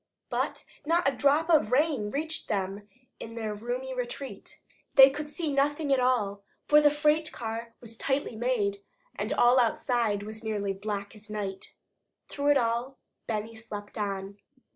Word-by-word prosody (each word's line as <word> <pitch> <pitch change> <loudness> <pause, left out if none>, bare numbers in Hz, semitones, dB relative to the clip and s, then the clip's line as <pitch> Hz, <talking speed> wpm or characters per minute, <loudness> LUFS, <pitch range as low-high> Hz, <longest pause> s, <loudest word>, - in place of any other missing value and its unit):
But - - -2 0.2
not 335 +1 +2
a 275 - +2
drop 285 +5 +3
of 300 -9 +4
rain 270 -6 +2
reached 315 +6 -3
them 200 0 -2 0.3
in 230 0 -8
their 220 -2 -3
roomy 245 +5 -4
retreat. 255 +2 -6 0.4
They 270 0 +10
could 295 +1 -5
see 310 -2 -3
nothing 285 +1 +2
at 265 - +3
all, 220 -6 +1 0.3
for 300 0 +7
the 295 - +6
freight 300 +2 +2
car 230 0 -5
was 225 -1 -9
tightly 270 -2 -1
made, 220 -4 0 0.4
and - - -3
all 245 +2 +5
outside 230 -3 +1
was 215 +1 -8
nearly 205 -3 -1
as 195 - -7
black 205 -1 -3
as 215 -1 -13
night. 200 -2 -5 0.6
Through 285 0 -2
it 290 - +6
all, 240 +2 -1 0.3
Benny 220 0 -3
slept 210 -2 -8
on. 200 -1 -4
235 Hz, 165 wpm, -28 LUFS, 210-280 Hz, 0.6 s, They